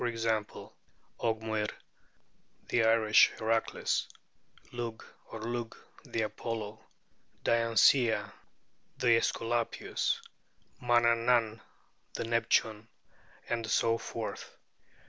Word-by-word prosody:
g._, 115 -3 -2 0.5
Ogmuir, 110 -2 -1 1.0
the 120 - +2
Irish 110 -1 +5
Heracles; 115 0 0 0.6
Lug 120 -2 -5 0.3
or 115 - -7
Lugh, 120 0 -4 0.3
the 110 - -2
Apollo; 110 0 -5 0.6
Diancéa, 115 +1 +3 0.6
the 125 - +1
Esculapius; 115 0 -1 0.6
Manannan, 115 -1 +2 0.5
the - - -2
Neptune; 115 -1 +1 0.6
and 115 -2 -2
so 115 0 +2
forth. - - -6
115 Hz, 75 wpm, -31 LUFS, 110-115 Hz, 1.0 s, Irish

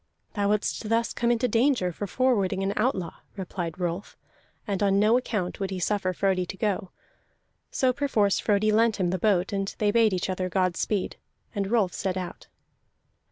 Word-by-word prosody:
"Thou 200 -1 0
wouldst 210 +1 -1
thus 230 +1 +1
come 235 - 0
into 240 +1 +2
danger 230 -5 +2
for 205 +4 -5
forwarding 200 -5 +1
an 195 +1 0
outlaw," 215 -7 -1 0.2
replied 180 -3 -4
Rolf, 175 +2 -3 0.5
and 200 -2 -2
on 195 -1 +3
no 215 +3 +4
account 210 -7 -1
would 195 -1 -2
he 190 -1 -4
suffer 190 0 0
Frodi 185 0 +1
to 190 +2 -7
go. 195 -3 -1 0.8
So 255 -1 +1
perforce 220 -8 +1
Frodi 215 0 +2
lent 225 +1 +3
him 175 -2 +1
the 185 - -1
boat, 195 -1 +2
and 195 0 -2
they 210 -1 +2
bade 225 -2 +4
each 180 - -1
other 185 -1 -2
God 185 -1 +1
speed, 205 -1 -1 0.4
and 200 -1 -2
Rolf 210 -6 +2
set 190 -1 -2
out. 180 -1 -6
200 Hz, 180 wpm, -26 LUFS, 185-220 Hz, 0.8 s, no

